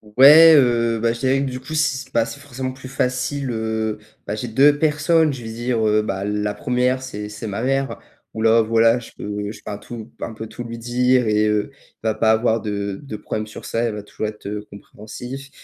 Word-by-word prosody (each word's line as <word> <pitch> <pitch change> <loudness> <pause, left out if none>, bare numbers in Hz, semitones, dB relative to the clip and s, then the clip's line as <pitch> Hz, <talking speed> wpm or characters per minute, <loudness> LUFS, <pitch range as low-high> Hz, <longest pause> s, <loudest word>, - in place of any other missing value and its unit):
Ouais, 155 +5 +9
heu, 120 -4 +3
bah 115 0 +2
je 115 - -5
dirais 130 +2 +2
que 135 -2 -2
du 125 - -5
coup, 130 +4 -9
si 150 -4 0
s - - -26
bah 115 -1 +3
c'est 140 - -8
forcément 130 -2 -5
plus 130 0 -11
facile, 130 +1 -2
heu, 110 -1 -2 0.3
bah, 105 - -3
j'ai 115 +3 -4
2 140 +5 +4
personnes, 155 0 +2
je 130 - -7
veux 115 - -6
dire, 120 0 -1
heu, 105 0 +3
bah 95 -2 -3
la 105 0 -1
1re, 125 +4 0
c'est 105 -5 -6
c'est 105 +2 -7
ma 100 +1 -3
mère, 135 +1 -1 0.3
où 110 - -5
là 115 +1 +5
voilà, 115 +1 +3
je 120 - -12
peux 105 0 -4
je - - -11
peux - - -8
un 100 - -4
tout 115 0 -9
un 115 - -4
peu 110 +1 -7
tout 120 - -8
lui 115 0 -7
dire 125 +1 +2
et 105 0 +2
heu, 105 +5 0 0.3
va 110 0 0
pas 110 0 +2
avoir 110 0 +2
de 100 -2 -3
de 135 -6 -7
problème 110 0 -4
sur 105 - -10
ça, 115 - -2
elle 115 -2 -1
va 105 - -6
toujours 105 +1 -4
être 105 -1 -8 0.2
compréhensive 125 +7 -9
115 Hz, 230 wpm, -21 LUFS, 110-130 Hz, 0.3 s, Ouais